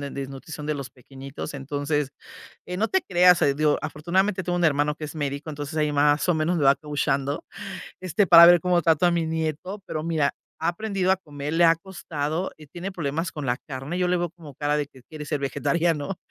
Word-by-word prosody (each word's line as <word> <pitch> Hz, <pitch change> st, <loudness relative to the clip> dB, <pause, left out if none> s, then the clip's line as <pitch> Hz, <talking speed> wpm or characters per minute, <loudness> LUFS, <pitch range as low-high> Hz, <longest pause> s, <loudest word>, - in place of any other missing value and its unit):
de 140 Hz, -1 st, -5 dB
desnutrición 140 Hz, +3 st, -7 dB
de 150 Hz, -, 0 dB
los 140 Hz, -2 st, -5 dB
pequeñitos, 135 Hz, +3 st, -9 dB
entonces, 145 Hz, +1 st, -2 dB, 0.5 s
no 185 Hz, +5 st, -1 dB
te 380 Hz, +7 st, +1 dB
creas, 180 Hz, -1 st, +6 dB, 0.2 s
digo, 150 Hz, 0 st, +2 dB
afortunadamente 185 Hz, +5 st, 0 dB
tengo 175 Hz, -1 st, -2 dB
un 175 Hz, -, 0 dB
hermano 145 Hz, -1 st, +2 dB
que 155 Hz, -, -9 dB
es 150 Hz, -, -8 dB
médico, 145 Hz, 0 st, -4 dB
entonces 145 Hz, +1 st, -6 dB
ahí 150 Hz, -1 st, +1 dB
más 145 Hz, +2 st, +3 dB
o 175 Hz, -, +4 dB
menos 160 Hz, +2 st, 0 dB
le 150 Hz, -, 0 dB
va 135 Hz, 0 st, +7 dB
coacheando, 140 Hz, -2 st, -2 dB, 0.6 s
este, 185 Hz, +2 st, +1 dB
para 170 Hz, 0 st, +10 dB
ver 175 Hz, -1 st, +7 dB
cómo 180 Hz, -1 st, +2 dB
trato 165 Hz, +1 st, +3 dB
a 175 Hz, -, +4 dB
mi 170 Hz, -1 st, 0 dB
nieto, 160 Hz, +5 st, -3 dB
pero 155 Hz, -, -4 dB
mira, 155 Hz, -4 st, +1 dB, 0.3 s
ha -, -, 0 dB
aprendido 195 Hz, 0 st, -2 dB
a -, -, 0 dB
comer, 150 Hz, -5 st, -6 dB
le 170 Hz, +1 st, +4 dB
ha 165 Hz, -1 st, +7 dB
costado 165 Hz, -2 st, -4 dB
y 155 Hz, -1 st, -14 dB
tiene 175 Hz, +6 st, -6 dB
problemas 165 Hz, -1 st, -3 dB
con 150 Hz, -3 st, -6 dB
la 120 Hz, -1 st, +1 dB
carne, 135 Hz, +5 st, -5 dB
yo 180 Hz, -1 st, +1 dB
le 180 Hz, -, +2 dB
veo 175 Hz, 0 st, -1 dB
como 155 Hz, -5 st, -13 dB
cara 145 Hz, +2 st, 0 dB
de 150 Hz, -1 st, -1 dB
que 130 Hz, -3 st, -18 dB
quiere 150 Hz, +3 st, -9 dB
ser 145 Hz, 0 st, -2 dB
vegetariano, 150 Hz, +4 st, -1 dB
155 Hz, 215 wpm, -25 LUFS, 145-175 Hz, 0.6 s, para